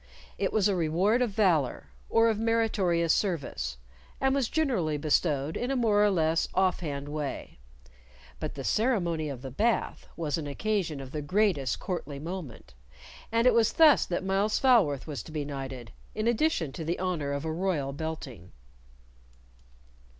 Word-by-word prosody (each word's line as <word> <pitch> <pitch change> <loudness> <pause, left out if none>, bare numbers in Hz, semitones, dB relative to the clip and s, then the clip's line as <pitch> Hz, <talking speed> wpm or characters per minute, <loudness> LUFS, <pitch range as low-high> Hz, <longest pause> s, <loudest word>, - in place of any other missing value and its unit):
It - - 0
was 210 -2 +3
a 200 - +1
reward 180 +8 +2
of 245 - +2
valor 175 - +1 0.2
or 225 0 +4
of 220 -2 +1
meritorious 210 -7 +2
service, 125 - -2 0.4
and 265 0 +2
was 270 -4 0
generally 220 - 0
bestowed 150 0 +1
in 245 - -2
a 270 - 0
more 215 -4 +3
or 210 - +5
less 165 -3 +1
off 185 0 +2
hand 145 -4 -4
way; 150 - -5 0.8
but - - -4
the 135 - -6
ceremony 175 - 0
of 130 -2 -7
the 135 - -6
Bath 225 - 0
was 165 -1 -1
an 150 - -5
occasion 170 -2 -2
of 130 -1 -9
the 150 - -3
greatest 175 -3 +1
courtly 160 -6 -4
moment, 150 - -7 0.6
and 230 +1 +2
it 250 - +6
was 230 -1 +3
thus 305 - +6
that 180 +1 -2
Myles 195 +3 +1
Falworth 205 - +3
was 145 -8 -5
to 155 - -12
be 150 -2 -3
knighted 135 -4 -6 0.2
in 215 +2 -1
addition 235 - +1
to 160 - -6
the 165 +2 -2
honor 175 -6 -2
of 140 +2 -3
a 160 - -2
royal 160 -6 -1
belting. 140 - -6
170 Hz, 165 wpm, -28 LUFS, 145-215 Hz, 0.8 s, it